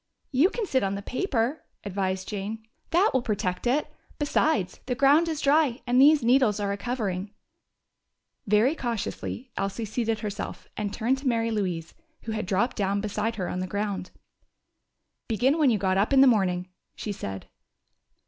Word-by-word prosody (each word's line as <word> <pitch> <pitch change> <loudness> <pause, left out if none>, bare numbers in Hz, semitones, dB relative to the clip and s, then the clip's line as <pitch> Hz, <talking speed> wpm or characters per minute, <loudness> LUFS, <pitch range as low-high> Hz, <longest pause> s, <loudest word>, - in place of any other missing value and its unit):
"You 285 +7 +4
can 455 0 -3
sit 265 -8 +1
on 195 0 -1
the 200 - -6
paper," 255 - -1 0.2
advised 190 -1 -2
Jane. 215 +2 -5 0.2
"That 365 +6 +3
will 260 - +2
protect 200 -2 -2
it. 275 +5 +2 0.3
Besides, 290 - +1
the 250 - 0
ground 280 +6 +5
is 315 -2 -3
dry, 280 -3 +3
and 250 +1 +4
these 295 -1 +6
needles 240 -3 +3
are 200 -1 -1
a - - -1
covering." 205 -4 -3 1.1
Very 215 +7 +4
cautiously 240 -1 -4
Elsie 195 +3 -2
seated 225 0 -1
herself, 205 -1 -5
and 205 -1 -3
turned 240 +5 0
to 275 - -4
Mary 230 -2 +1
Louise, 180 -6 -2 0.3
who 225 - -4
had 215 -3 -3
dropped 205 +7 0
down 200 -1 +1
beside 215 +2 -2
her 185 -5 -3
on 180 - -3
the 185 - -2
ground. 200 -2 -3 1.2
"Begin 255 +7 +2
when 295 -4 +5
you 225 - +3
got 190 -1 +1
up 205 - +1
in 270 - +7
the - - +8
morning," 190 -7 +2 0.3
she 210 - -4
said. 95 - -6
220 Hz, 170 wpm, -26 LUFS, 200-260 Hz, 1.2 s, the